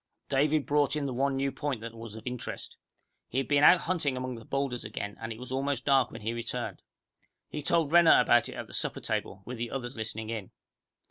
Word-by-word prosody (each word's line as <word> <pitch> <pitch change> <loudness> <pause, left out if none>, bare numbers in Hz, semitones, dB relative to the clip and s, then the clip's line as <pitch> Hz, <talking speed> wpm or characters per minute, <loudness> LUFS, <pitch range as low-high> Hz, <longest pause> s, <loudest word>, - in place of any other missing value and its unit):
David 145 +2 +2
brought 145 -1 +2
in 150 -2 -1
the 135 - -2
one 135 +2 +1
new 135 0 0
point 140 -2 -2
that 115 0 -6
was 115 -2 -9
of 110 - -10
interest. 125 -1 -5 0.5
He 125 - -5
had 135 - +1
been 145 0 +3
out 175 +3 +8
hunting 155 -7 0
among 130 0 -3
the 115 -2 -9
boulders 135 -3 -2
again, 100 -1 -5
and 115 0 -4
it 110 - -6
was 125 +1 -8
almost 135 -1 -1
dark 135 -3 +4
when - - -9
he 110 +2 -2
returned. 115 -1 -4 0.7
He 150 - -4
told 165 -1 +2
Renner 170 -1 +8
about - - +4
it - - -8
at - - -5
the - - -14
supper - - -1
table, 95 - -3
with 125 -1 -6
the 120 0 -2
others 125 0 -4
listening 110 0 -4
in. 110 -5 -4
130 Hz, 225 wpm, -29 LUFS, 115-145 Hz, 0.7 s, out